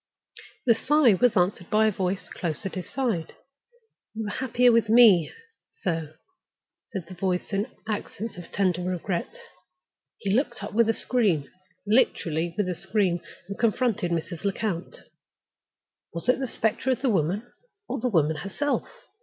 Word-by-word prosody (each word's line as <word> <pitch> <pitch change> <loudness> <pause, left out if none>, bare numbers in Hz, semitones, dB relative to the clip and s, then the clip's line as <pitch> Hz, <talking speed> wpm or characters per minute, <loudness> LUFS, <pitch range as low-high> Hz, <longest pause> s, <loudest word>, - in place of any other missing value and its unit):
The 235 - +6
sigh 265 +1 +4
was 240 +3 +3
answered 180 -1 +1
by 215 +1 +4
a 215 - +3
voice 185 -1 -2
close 165 +1 -4
at 195 - -3
his 185 -2 -6
side. 230 - -2 0.8
"You 220 - -3
were 205 - -3
happier 250 0 +3
with 230 -2 +3
me, 220 -8 +7 0.5
sir," 160 -3 -2 0.7
said 190 -6 -5
the 185 - -9
voice, 185 +2 -2
in 200 +4 0 0.2
accents 220 +1 -4
of 175 -1 -10
tender 185 -3 +1
regret. 180 0 -2 0.9
He 195 -1 -1
looked 240 -3 0
up 205 - -6
with 230 +1 +3
a 225 - +2
scream—literally, 185 - 0
with 205 -3 +1
a 180 - 0
scream—and 190 0 -2
confronted 230 -5 +1
Mrs. 170 +1 -3
Lecount. 200 -3 -3 1.1
Was 170 - -5
it 250 +1 +4
the 265 - -2
specter 225 +3 -1
of 260 +1 0
the 265 - +3
woman, 195 +6 -1 0.3
or - - -3
the 250 - 0
woman 160 -6 +2
herself? 200 - -2
200 Hz, 150 wpm, -26 LUFS, 175-230 Hz, 1.1 s, me